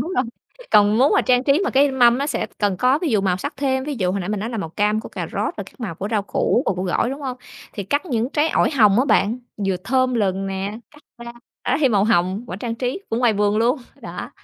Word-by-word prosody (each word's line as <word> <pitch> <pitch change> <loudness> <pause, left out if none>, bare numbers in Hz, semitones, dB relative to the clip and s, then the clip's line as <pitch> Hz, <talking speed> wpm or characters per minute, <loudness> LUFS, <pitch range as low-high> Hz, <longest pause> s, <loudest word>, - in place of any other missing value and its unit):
Đúng 360 - -3
rồi, 260 - +1 0.5
còn 210 +1 +5
muốn 270 +4 +4
mà - - +4
trang 250 0 +2
trí 280 +4 +3
mà - - 0
cái 280 +1 +4
mâm 245 -2 +4
nó 280 - -1
sẽ - - -2
cần 205 -3 +1
có 255 +8 +3
ví 335 - -2
dụ 215 -3 +2
màu 190 -2 +1
sắc 185 - -5
thêm, 265 -1 0
ví 295 0 -3
dụ 185 -3 +1
hồi 200 - -2
nãy 180 - -5
mình 210 -1 -2
nói 220 +3 -3
là 230 - -4
màu 165 - -4
cam 210 +5 0
của - - -9
cà - - -5
rốt - - -2
và - - -4
các - - -18
màu 205 -8 -4
của 195 +5 -5
rau 215 -3 +1
củ 205 +5 0
và - - +2
của 180 - -3
gỏi, 190 +6 0
đúng 275 +2 -6
hông? 260 -3 -4 0.4
Thì 205 - -5
cắt 285 - -1
những 240 -5 -1
trái 300 +1 +1
ổi - - +2
hồng 215 -8 +4
á 255 - +3
bạn, 230 -3 +2 0.3
vừa 190 -1 +1
thơm 255 +2 +1
lừng 195 -3 0
nè, 195 +2 -4
cắt 295 0 -19 0.2
ra, 235 - -8 0.3
đó - - +1
thì 275 - +4
màu 205 -4 +2
hồng 190 +1 +1
quả 180 - -6
trang 230 +2 -4
trí 250 +9 -3
cũng 225 - 0
ngoài 240 -2 +3
vườn 205 0 +1
luôn, 235 +6 +2 0.2
đó. - - -7
230 Hz, 285 wpm, -21 LUFS, 200-265 Hz, 0.5 s, còn